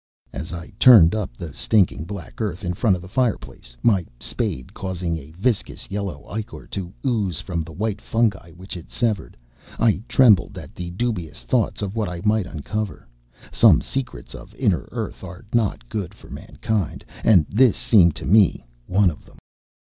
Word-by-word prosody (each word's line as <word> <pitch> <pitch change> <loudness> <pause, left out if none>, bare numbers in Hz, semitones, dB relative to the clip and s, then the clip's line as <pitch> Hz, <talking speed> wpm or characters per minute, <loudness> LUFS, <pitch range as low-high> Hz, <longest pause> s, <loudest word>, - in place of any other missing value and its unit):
As 80 - -6
I 85 0 -7
turned 105 -10 +8
up 100 - -3
the 80 -4 -7
stinking 95 -6 +2
black 100 +2 -8
earth 100 -4 -3
in 90 - -1
front 100 +1 +2
of 90 - -8
the - - -9
fireplace, 95 - -2
my 100 -6 +4 0.2
spade 65 +1 -3
causing 90 -3 -3
a 75 -2 -8
viscous 115 0 -2
yellow 100 -2 -4
ichor 110 +1 -6
to 90 -3 -4
ooze 105 - 0
from 85 0 -3
the 80 +1 -7
white 105 +4 -3
fungi 110 -7 0
which 95 +3 -9
it 85 - -9
severed, 110 - -1 0.4
I 110 -4 +2
trembled 110 -9 +4
at - - -9
the 90 -1 -6
dubious 90 -6 -3
thoughts 115 -4 0
of 100 +1 -4
what 110 -4 -1
I 90 0 -6
might 105 -2 +2
uncover. 100 - -5 0.4
Some - - +6
secrets 125 - -5
of - - -11
inner - - 0
earth - - -5
are 90 +1 -9
not 110 - 0
good 100 - -4
for - - -16
mankind, 105 -9 -3 0.2
and 90 -9 +6
this 120 0 +4
seemed 85 -8 +5
to - - -6
me 100 +1 +4 0.2
one 95 -1 +3
of 75 - -13
them. - - -19
95 Hz, 175 wpm, -22 LUFS, 85-110 Hz, 0.4 s, turned